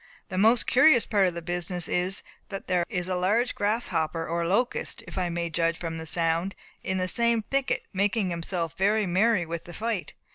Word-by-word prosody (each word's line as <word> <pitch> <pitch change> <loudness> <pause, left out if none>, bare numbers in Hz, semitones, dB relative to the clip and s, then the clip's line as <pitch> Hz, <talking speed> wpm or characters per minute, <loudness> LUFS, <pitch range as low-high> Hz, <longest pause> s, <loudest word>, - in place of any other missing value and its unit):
The 185 - -4
most 225 +4 +4
curious 260 -2 +5
part 200 -3 +3
of 175 - -3
the 170 - -5
business 175 0 -2
is, 180 +2 0 0.3
that 195 -1 -6
there 180 -2 +1
is 180 -4 -2
a 185 - -1
large 210 +7 +1
grasshopper 175 -7 -1
or 170 0 -1
locust 240 +7 -1
(if - - -10
I 180 -2 0
may 170 0 -3
judge 165 +1 +1
from 165 -1 -5
the 160 - -5
sound), 165 +3 +1 0.3
in 190 - -2
the 185 0 0
same 235 +2 +2
thicket, 275 +3 -1
making 200 0 +1
himself 170 -1 -3
very 205 +3 +2
merry 190 +1 +2
with 165 0 -5
the 175 - -10
fight. 220 -4 -3
185 Hz, 195 wpm, -27 LUFS, 170-215 Hz, 0.3 s, curious